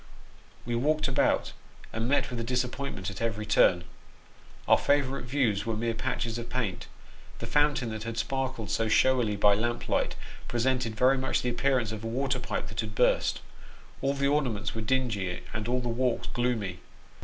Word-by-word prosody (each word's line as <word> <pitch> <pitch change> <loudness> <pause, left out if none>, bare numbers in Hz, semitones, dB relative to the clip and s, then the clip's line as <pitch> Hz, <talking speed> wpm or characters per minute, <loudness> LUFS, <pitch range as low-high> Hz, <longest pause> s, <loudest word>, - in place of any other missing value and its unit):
We 120 - -2
walked 150 +6 +1
about, 130 - +1 0.4
and 115 +2 -1
met 140 -1 +2
with 120 - -4
a - - -2
disappointment 125 -4 -2
at 100 - -8
every 110 -2 -1
turn; 90 -4 +4 0.8
our - - +6
favourite 140 -3 +1
views 120 -6 +1
were 115 -1 -2
mere 115 +1 0
patches 115 -1 -2
of 115 - -7
paint; 115 -8 -2 0.5
the - - -6
fountain 145 -5 +2
that 110 -1 -5
had 115 0 -5
sparkled 130 -4 -2
so 115 - +1
showily 120 -2 +3
by 100 0 +5
lamp 120 +3 -1
light, - - 0 0.3
presented 120 -1 0
very 130 +3 +4
much 130 0 0
the 125 - +1
appear 135 +3 +2
ance 115 -4 -1
of 110 0 -6
a - - -3
water 130 +4 -1
pipe - - -3
that - - -7
had - - -6
burst; - - +2 0.6
all 135 +1 +1
the 140 0 +1
ornaments 125 -9 0
were 115 - -4
dingy, 110 -7 -1
and 110 -1 -3
all 125 +1 +1
the 120 - -4
walks 120 0 0
gloomy. 115 -7 -1
120 Hz, 180 wpm, -28 LUFS, 110-130 Hz, 0.8 s, our